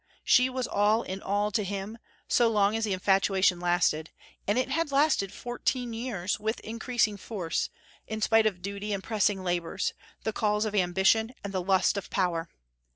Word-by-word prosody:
She 250 Hz, +1 st, +5 dB
was 255 Hz, -1 st, -2 dB
all 210 Hz, +3 st, +2 dB
in 190 Hz, +1 st, -6 dB
all 205 Hz, +2 st, 0 dB
to 215 Hz, -1 st, 0 dB
him, 200 Hz, +3 st, -5 dB, 0.3 s
so 240 Hz, -, +4 dB
long 210 Hz, -1 st, +2 dB
as 225 Hz, 0 st, 0 dB
the 205 Hz, -, -1 dB
infatuation 190 Hz, -1 st, +2 dB
lasted; 175 Hz, -3 st, +1 dB, 0.4 s
and 205 Hz, +3 st, +2 dB
it 255 Hz, -, +1 dB
had 310 Hz, +2 st, 0 dB
lasted 275 Hz, -9 st, +2 dB
fourteen 245 Hz, 0 st, -3 dB
years, 225 Hz, -6 st, -2 dB
with 220 Hz, +2 st, -2 dB
increasing 230 Hz, -1 st, -1 dB
force, 185 Hz, -5 st, -3 dB, 0.4 s
in 220 Hz, -, -4 dB
spite 220 Hz, 0 st, +4 dB
of 180 Hz, -4 st, -3 dB
duty 200 Hz, +1 st, -4 dB
and 195 Hz, -1 st, -3 dB
pressing 205 Hz, -3 st, 0 dB
labors, 175 Hz, +1 st, -1 dB, 0.3 s
the 220 Hz, -, -1 dB
calls 210 Hz, 0 st, +1 dB
of 215 Hz, -, -3 dB
ambition 195 Hz, +5 st, +2 dB
and 200 Hz, -1 st, -5 dB
the 185 Hz, -, 0 dB
lust 190 Hz, +2 st, +2 dB
of 200 Hz, -, -5 dB
power. 175 Hz, -3 st, -1 dB
205 Hz, 175 wpm, -28 LUFS, 190-225 Hz, 0.4 s, She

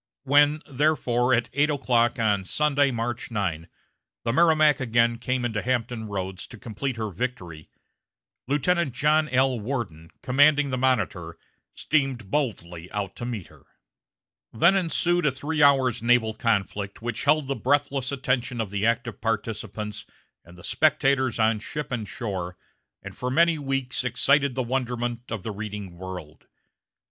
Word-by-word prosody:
When, 145 Hz, +2 st, +4 dB
therefore, 130 Hz, -4 st, +1 dB
at 120 Hz, -1 st, +1 dB
eight 145 Hz, +3 st, +2 dB
o'clock 125 Hz, -5 st, +2 dB
on 105 Hz, -4 st, +1 dB
Sunday, 145 Hz, +6 st, +2 dB
March 120 Hz, -1 st, -3 dB
9, 90 Hz, -7 st, -3 dB, 0.5 s
the 115 Hz, -, 0 dB
Merrimac 155 Hz, -2 st, +4 dB
again 115 Hz, -2 st, +2 dB
came 125 Hz, 0 st, -1 dB
into 110 Hz, -3 st, -1 dB
Hampton 120 Hz, -2 st, -2 dB
Roads 95 Hz, -2 st, -5 dB
to 120 Hz, -, -11 dB
complete 120 Hz, +4 st, -4 dB
her 110 Hz, -2 st, -3 dB
victory, 90 Hz, -7 st, -5 dB, 0.8 s
Lieutenant 150 Hz, +1 st, +1 dB
John 150 Hz, +2 st, +2 dB
L. 130 Hz, -1 st, +2 dB
Worden, 100 Hz, -, -4 dB
commanding 145 Hz, +2 st, +4 dB
the 130 Hz, -, -1 dB
Monitor, 100 Hz, -10 st, 0 dB, 0.4 s
steamed 135 Hz, -9 st, -1 dB
boldly 90 Hz, -, -3 dB
out 100 Hz, -2 st, -4 dB
to 120 Hz, -, -5 dB
meet 115 Hz, -7 st, -4 dB
her. -, -, -19 dB, 0.9 s
Then 170 Hz, +12 st, +4 dB
ensued 175 Hz, -2 st, +1 dB
a -, -, +3 dB
three 145 Hz, +4 st, -2 dB
hours' 135 Hz, -5 st, +4 dB
naval 115 Hz, -2 st, +3 dB
conflict 105 Hz, -2 st, -2 dB
which 120 Hz, -1 st, -3 dB
held 150 Hz, 0 st, +3 dB
the 135 Hz, -, -1 dB
breathless 135 Hz, -1 st, 0 dB
attention 130 Hz, -2 st, -1 dB
of 110 Hz, -4 st, -2 dB
the 100 Hz, +2 st, 0 dB
active 115 Hz, +1 st, -1 dB
participants 110 Hz, -2 st, -3 dB, 0.4 s
and 85 Hz, +1 st, -16 dB
the 85 Hz, -, -14 dB
spectators 135 Hz, -5 st, +2 dB
on 110 Hz, -1 st, +2 dB
ship 150 Hz, +6 st, -6 dB
and 115 Hz, -4 st, -3 dB
shore, 95 Hz, -6 st, -5 dB, 0.5 s
and -, -, -9 dB
for 125 Hz, -, -3 dB
many 165 Hz, +4 st, +3 dB
weeks 135 Hz, -3 st, -2 dB
excited 140 Hz, +2 st, +2 dB
the 130 Hz, -, 0 dB
wonderment 120 Hz, -1 st, -3 dB
of 110 Hz, -5 st, -4 dB
the 110 Hz, -, -4 dB
reading 105 Hz, -3 st, -6 dB
world. 90 Hz, -4 st, -9 dB
120 Hz, 150 wpm, -25 LUFS, 105-140 Hz, 0.9 s, When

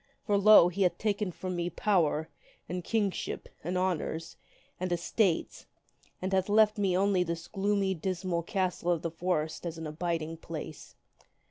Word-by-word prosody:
For, 205 Hz, -, +2 dB
lo! 200 Hz, -3 st, +8 dB
he 190 Hz, +3 st, -4 dB
hath 180 Hz, -2 st, +3 dB
taken 205 Hz, -2 st, -1 dB
from 185 Hz, +1 st, -5 dB
me 175 Hz, 0 st, -1 dB
power, 165 Hz, -4 st, +1 dB, 0.4 s
and 180 Hz, 0 st, -4 dB
kingship, 205 Hz, -1 st, -2 dB, 0.2 s
and 180 Hz, +4 st, -2 dB
honors, 170 Hz, -3 st, -2 dB, 0.4 s
and 185 Hz, 0 st, -2 dB
estates, 175 Hz, +1 st, 0 dB, 0.5 s
and 190 Hz, +1 st, -3 dB
hath 190 Hz, +1 st, +1 dB
left 215 Hz, 0 st, +4 dB
me 190 Hz, -3 st, +2 dB
only 195 Hz, -1 st, +3 dB
this 170 Hz, -1 st, -3 dB
gloomy, 200 Hz, -1 st, 0 dB
dismal 185 Hz, 0 st, -2 dB
castle 180 Hz, 0 st, -1 dB
of 170 Hz, -2 st, 0 dB
the 165 Hz, -, -2 dB
forest 165 Hz, -2 st, -2 dB
as 170 Hz, -2 st, -4 dB
an 160 Hz, -, -6 dB
abiding 165 Hz, +1 st, -3 dB
place. 160 Hz, -2 st, -8 dB
180 Hz, 155 wpm, -30 LUFS, 165-195 Hz, 0.5 s, lo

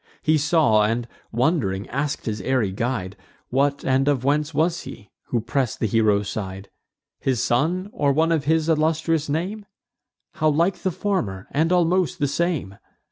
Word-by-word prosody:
He 155 Hz, -, +3 dB
saw, 145 Hz, -7 st, +3 dB
and, 115 Hz, +3 st, 0 dB, 0.2 s
wond'ring, 115 Hz, -, 0 dB
ask'd 140 Hz, +3 st, -2 dB
his 105 Hz, -2 st, -3 dB
airy 120 Hz, -3 st, 0 dB
guide, 100 Hz, -3 st, -3 dB, 0.4 s
What 140 Hz, +2 st, +1 dB
and 135 Hz, +1 st, +2 dB
of 140 Hz, -4 st, +1 dB
whence 150 Hz, +3 st, +1 dB
was 165 Hz, +3 st, +1 dB
he, 100 Hz, -4 st, -11 dB
who 120 Hz, -, -1 dB
press'd 125 Hz, +2 st, -1 dB
the -, -, 0 dB
hero's 105 Hz, -1 st, +2 dB
side: 95 Hz, -1 st, -5 dB, 0.5 s
"His 130 Hz, -3 st, 0 dB
son, 165 Hz, +10 st, +1 dB
or 145 Hz, -1 st, +2 dB
one 160 Hz, +4 st, +2 dB
of 160 Hz, -3 st, +1 dB
his 160 Hz, +1 st, +2 dB
illustrious 160 Hz, -1 st, +1 dB
name? 185 Hz, +8 st, -2 dB, 0.7 s
How 155 Hz, -, +2 dB
like 170 Hz, +5 st, +1 dB
the 190 Hz, -, 0 dB
former, 165 Hz, -, -2 dB
and 160 Hz, +4 st, +1 dB
almost 180 Hz, 0 st, +2 dB
the 145 Hz, -4 st, +1 dB
same! 145 Hz, -, -2 dB
140 Hz, 160 wpm, -23 LUFS, 115-160 Hz, 0.7 s, He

